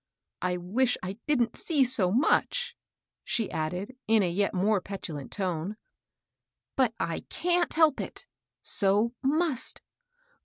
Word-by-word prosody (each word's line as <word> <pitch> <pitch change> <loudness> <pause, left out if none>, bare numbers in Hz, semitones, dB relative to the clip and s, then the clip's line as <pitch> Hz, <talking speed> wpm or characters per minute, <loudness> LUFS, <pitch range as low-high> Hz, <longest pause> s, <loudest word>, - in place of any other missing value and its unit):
I 180 0 0
wish 225 +8 +1
I 190 +4 -5
didn't 245 -6 +2
see 300 -5 +2
so 215 -8 +2
much," 325 - +2 0.5
she 225 -3 -1
added, 180 +10 -3
in 220 -2 +5
a - - +2
yet 200 +3 +1
more 200 +1 +2
petulant 165 -8 -6
tone," 185 +1 -2 1.0
but 250 -4 +2
I 165 -1 -1
can't 350 0 +1
helg^it 315 -3 +1 0.2
— - - -63 0.2
so 205 +3 +3
must. 295 -1 +1
215 Hz, 125 wpm, -28 LUFS, 185-265 Hz, 1.0 s, in